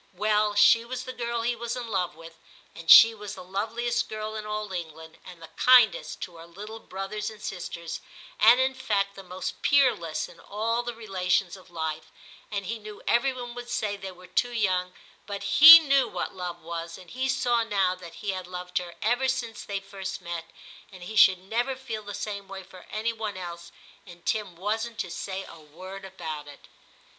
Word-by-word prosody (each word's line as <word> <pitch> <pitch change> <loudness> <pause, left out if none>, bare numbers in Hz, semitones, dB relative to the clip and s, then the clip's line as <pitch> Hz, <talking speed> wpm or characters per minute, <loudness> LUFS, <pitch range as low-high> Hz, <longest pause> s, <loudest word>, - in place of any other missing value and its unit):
'Well, 210 +2 +1
she 220 +2 +6
was 250 +1 -5
the 255 - -7
girl 235 -1 -3
he 240 +1 0
was 235 +1 -4
in 250 -1 -5
love 185 -5 -1
with, 165 0 -13 0.3
and 165 0 -10
she 225 0 +10
was 210 -2 -8
the - - -9
loveliest 225 +6 -2
girl 215 0 -5
in 215 -1 -5
all 210 -2 -4
England, 160 -2 -7
and 180 -2 -12
the 165 - -12
kindest 250 -4 +5
to 175 -2 -7
her 165 +1 -12
little 210 +6 -9
brothers 195 +1 -5
and 215 -1 -12
sisters, 170 -4 -6 0.4
and, 235 +3 +7
in 260 0 +2
fact, 205 -7 -1
the 195 - -10
most 185 0 -6
peer 280 -3 +5
less 165 -2 -4
in - - -16
all 225 +3 -2
the 240 -1 -5
relations 190 -4 0
of 185 -1 -16
life; 160 -2 -4 0.4
and 200 -2 -3
he 230 +3 -4
knew 210 -1 -11
every 265 +3 +3
one 245 -2 -7
would 245 0 -8
say 210 -4 -1
they 195 -1 -7
were 180 0 -15
too 245 +7 0
young, 185 -5 0 0.4
but 200 -1 -5
he 305 +12 +11
knew 275 -5 +3
what 180 -4 -4
love 180 -2 -6
was, 165 0 -6
and 180 -2 -14
he 260 +1 -2
saw 240 -2 +2
now 195 -5 +1
that 180 -2 -11
he 200 - +1
had 185 -1 -6
loved 180 0 -3
her 175 -1 -9
ever 245 +4 +2
since 230 -4 -3
they 200 -1 -3
first 195 -1 -6
met, 170 -1 -5 0.5
and 185 -2 -12
he 220 +5 -7
should 190 -3 +7
never 235 +8 -2
feel 245 -5 -6
the 205 -1 -7
same 200 -2 -5 0.2
for 185 0 -15
any 220 +2 -2
one 215 -3 -5
else, 170 -1 -8 0.4
and 175 -1 -14
Tim 210 -5 -1
wasn't 220 +5 -3
to 180 - -4
say 190 +2 -5
a 165 - -12
word 185 +6 -10
about 155 -6 -7
it.' 145 -1 -14
200 Hz, 205 wpm, -27 LUFS, 180-230 Hz, 0.5 s, he